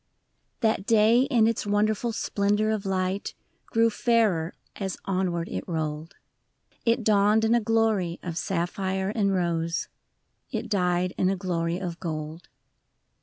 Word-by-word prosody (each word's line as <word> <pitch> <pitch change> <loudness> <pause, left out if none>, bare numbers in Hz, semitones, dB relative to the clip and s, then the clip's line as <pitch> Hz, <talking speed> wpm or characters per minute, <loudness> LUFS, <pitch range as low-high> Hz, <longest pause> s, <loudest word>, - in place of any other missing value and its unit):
I. - - +6
HAT 215 -2 -1
day 225 +2 +5
in 235 -6 +4
its 230 0 +1
wonderful 215 +3 +1
splendor 210 0 0
of 210 -2 -2
light 190 +1 -1 0.3
Grew 230 0 +3
fairer 210 -8 +1 0.2
as 190 -2 -4
onward 180 -3 -1
it - - -4
rolled; 155 -1 -3 0.7
It 230 +1 +3
dawned 210 +1 +4
in 225 - +3
a 240 - +3
glory 215 -6 +1
of 170 -2 -4
sapphire 190 +2 -1
and 205 -2 +1
rose, 170 -3 -1 0.6
It - - -3
died 180 -2 +1
in 185 - +3
a 195 - +1
glory 170 -2 -1
of 175 -2 -5
gold. 155 -1 -5
195 Hz, 140 wpm, -26 LUFS, 175-220 Hz, 0.7 s, I